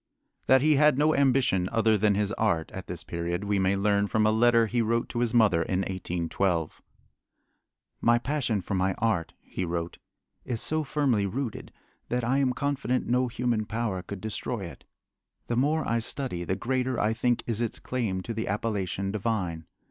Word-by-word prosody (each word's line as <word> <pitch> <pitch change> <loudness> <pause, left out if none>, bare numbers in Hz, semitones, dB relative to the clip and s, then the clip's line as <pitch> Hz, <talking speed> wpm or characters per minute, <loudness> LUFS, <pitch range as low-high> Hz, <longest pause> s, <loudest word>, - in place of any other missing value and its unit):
That 130 0 +5
he 155 -1 +4
had 150 -2 +5
no 155 +2 +3
ambition 130 -9 +2
other 115 -1 +3
than 105 0 +2
his 105 0 0
art 100 -8 0
at 95 -2 -8
this 85 -2 -5
period 85 +2 -3
we 100 -1 0
may 95 +1 +2
learn 100 +1 +2
from 110 +1 +1
a 110 - +4
letter 115 +1 +4
he 120 +2 0
wrote 115 +1 0
to 120 - -3
his 120 -2 +1
mother 105 -8 +4
in 95 +2 0
1812. 90 -2 -2 1.2
My 120 0 +4
passion 120 -5 -1
for 90 - -5
my 95 0 +1
art 105 -8 -1
[he - - -5
wrote] 85 -1 -3 0.4
is 120 -3 -3
so 155 +5 +1
firmly 135 -8 +1
rooted 120 +2 -4 0.4
that 125 0 -1
I 130 +4 +2
am 135 -2 +2
confident 135 -2 -1
no 125 +1 +2
human 120 -3 -1
power 110 -5 -2
could 95 +1 -8
destroy 110 +1 -3
it. 85 -3 -9 0.6
The 120 - -2
more 150 +5 +1
I 115 0 +1
study 115 -6 -2
the 95 - -1
greater 130 +3 -1
I 110 +1 +2
think 120 +1 0
is 115 -1 -2
its 115 - -2
claim 110 -7 -2
to 115 - -4
the 110 +1 -3
appellation 100 -2 -2
divine. 95 -7 -2
110 Hz, 185 wpm, -27 LUFS, 95-125 Hz, 1.2 s, That